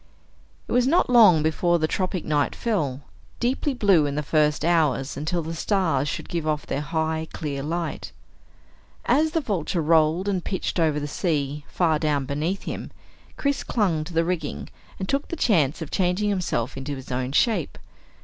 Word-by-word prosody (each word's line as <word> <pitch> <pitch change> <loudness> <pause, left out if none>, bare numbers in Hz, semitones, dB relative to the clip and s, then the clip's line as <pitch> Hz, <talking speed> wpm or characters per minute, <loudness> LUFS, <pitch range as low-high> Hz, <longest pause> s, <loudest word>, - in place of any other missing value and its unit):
It - - -9
was 245 +1 +3
not 320 -3 +3
long 205 -10 +7
before 175 +2 +2
the 155 -1 0
tropic 185 0 -2
night 145 -2 0
fell, 150 - -1 0.4
deeply 260 +3 0
blue 195 -10 +4
in 140 - -3
the 150 - -1
first 150 +1 +1
hours 155 -6 +1
until 160 +5 -2
the 165 +1 -5
stars 160 -6 0
should - - -5
give 165 -2 -3
off 150 -1 -1
their 140 - -2
high 160 +1 -2
clear 140 -3 -4
light. 165 +3 -3 0.9
As 315 +2 +3
the 325 - +1
Vulture 185 - -2
rolled 160 +3 +3
and 190 -3 0
pitched 190 -1 -2
over 155 -3 +2
the 145 - -4
sea 145 -3 -2
far 160 -4 +1
down 150 -3 0
beneath 155 +8 -2
him, - - -5 0.5
Chris 280 -1 0
clung 180 -9 0
to 170 - -9
the 165 0 +3
rigging 155 - -3 0.3
and 190 - -4
took 275 +5 -1
the - - -4
chance 160 - +2
of 155 - -10
changing 185 +3 +1
himself 170 - -1
into 135 +1 -4
his 130 -1 -9
own 125 +1 -2
shape. 190 - +1
160 Hz, 180 wpm, -24 LUFS, 150-190 Hz, 0.9 s, long